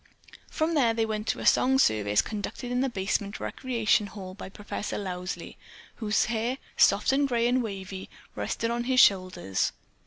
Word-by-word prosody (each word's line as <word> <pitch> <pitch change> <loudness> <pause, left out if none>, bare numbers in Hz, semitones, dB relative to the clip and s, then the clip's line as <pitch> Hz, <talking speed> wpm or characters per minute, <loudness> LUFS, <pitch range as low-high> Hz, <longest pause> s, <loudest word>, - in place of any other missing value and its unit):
From 315 +2 0
there 240 -7 +3
they 225 0 +1
went 215 0 -3
to - - 0
a - - -5
song 265 +1 +4
service 105 - +3
conducted 220 +4 -5
in 245 0 +1
the 270 - +1
basement 200 -1 -2
recreation 230 -4 0
hall 190 -2 -8
by 190 - -9
Professor 205 +1 -5
Lowsley, 180 -2 -5 0.4
whose 215 -2 +1
hair, 235 +3 -1 0.2
soft, 205 +6 +4
grey 235 -2 +1
and 250 +1 +2
wavy, 195 -3 -6 0.3
rested 230 0 -2
on 240 0 -2
his 255 0 +3
shoulders. 185 - +3
215 Hz, 160 wpm, -27 LUFS, 195-240 Hz, 0.4 s, song